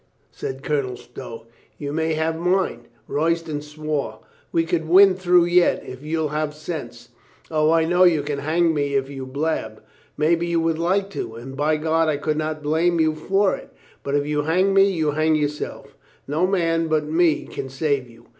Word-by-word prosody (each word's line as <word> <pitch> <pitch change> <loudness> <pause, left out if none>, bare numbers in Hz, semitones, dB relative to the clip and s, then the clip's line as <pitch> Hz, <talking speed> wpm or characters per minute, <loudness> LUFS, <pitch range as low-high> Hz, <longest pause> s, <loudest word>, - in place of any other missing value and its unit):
said 135 +1 -6
Colonel 140 -5 -1
Stow. 115 -2 -10 0.3
"You 145 -1 -5
may 160 +1 0
have 160 +1 0
mine." 180 -7 0 0.2
Royston 160 -1 -1
swore. 150 -6 -4 0.3
"We 165 - +2
can 165 -1 -2
win 190 +2 +7
through 180 -1 +3
yet, 175 0 +3
if 130 +1 -9
you'll 155 0 -1
have 150 0 -2
sense. 150 -7 -7 0.4
O, 155 -1 +2
I 165 0 +3
know 175 +2 +3
you 160 -5 +3
can 145 -1 -3
hang 165 +3 +1
me 145 -2 -1
if 135 0 0
you 135 -2 -6
blab. 135 -6 -3 0.3
Maybe 165 +3 +2
you 170 -1 +1
would 165 -1 0
like 195 +4 0
to, 115 - -5
and 130 +3 -9
by 150 +2 +1
God, 160 +1 +1
I 150 - 0
could 150 +1 -1
not 155 -1 -3
blame 165 +3 +1
you 155 -1 +3
for 195 +5 +1
it. - - -12 0.3
But 140 - -2
if 145 0 +1
you 150 0 0
hang 180 +6 +2
me, 195 0 +5
you 160 -5 0
hang 155 +1 +2
yourself. 150 -1 -4 0.3
No 155 +6 +1
man 165 -3 +1
but 155 -1 +1
me 160 0 +2
can 135 - -6
save 135 -2 -1
you." 115 0 -18
155 Hz, 190 wpm, -22 LUFS, 145-165 Hz, 0.4 s, win